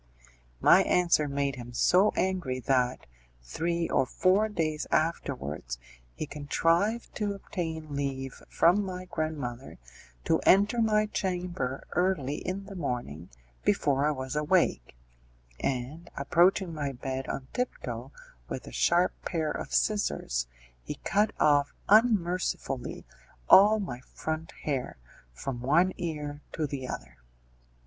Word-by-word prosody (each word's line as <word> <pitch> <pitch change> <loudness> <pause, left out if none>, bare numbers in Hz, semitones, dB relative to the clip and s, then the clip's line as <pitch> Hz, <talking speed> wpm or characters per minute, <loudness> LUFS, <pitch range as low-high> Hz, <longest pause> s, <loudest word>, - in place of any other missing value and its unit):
My - - +7
answer 170 -4 +3
made 140 -1 -1
him 120 0 -8
so 185 - +4
angry 180 -9 -1
that, 125 -1 +1 0.4
three 170 - -1
or 130 - +2
four 195 +9 +2
days 155 -6 -2
afterwards, 125 - -1 0.4
he - - -3
contrived 165 +9 0
to 205 -2 -1
obtain 160 -6 -5
leave 135 -2 -3
from 185 +5 +4
my 185 -1 -5
grandmother 145 -7 -4 0.5
to - - +3
enter 205 +5 +4
my 215 -1 +3
chamber 180 -10 -3
early 160 -6 0
in 195 +2 -4
the 195 - -9
morning, 120 - -4 0.3
before 140 - +2
I - - +3
was 130 -2 -3
awake, 150 - +1 0.6
and, 135 +6 -3
approaching 175 +5 +3
my 145 -3 -3
bed 130 +1 -4
on 130 - -4
tiptoe 250 0 -4 0.4
with - - -5
a - - -9
sharp 175 +1 +3
pair 160 -4 -1
of - - -5
scissors, 60 - 0 0.3
he - - -6
cut 205 +3 +2
off 145 -1 +3
unmercifully 185 - +2 0.4
all 210 +3 +8
my 130 -12 -4
front 160 +4 -5
hair, 135 - -2 0.3
from 120 - -5
one 170 +9 +3
ear 150 -4 -4
to 160 - -1
the 135 -3 -4
other. - - -7
155 Hz, 125 wpm, -29 LUFS, 135-185 Hz, 0.6 s, all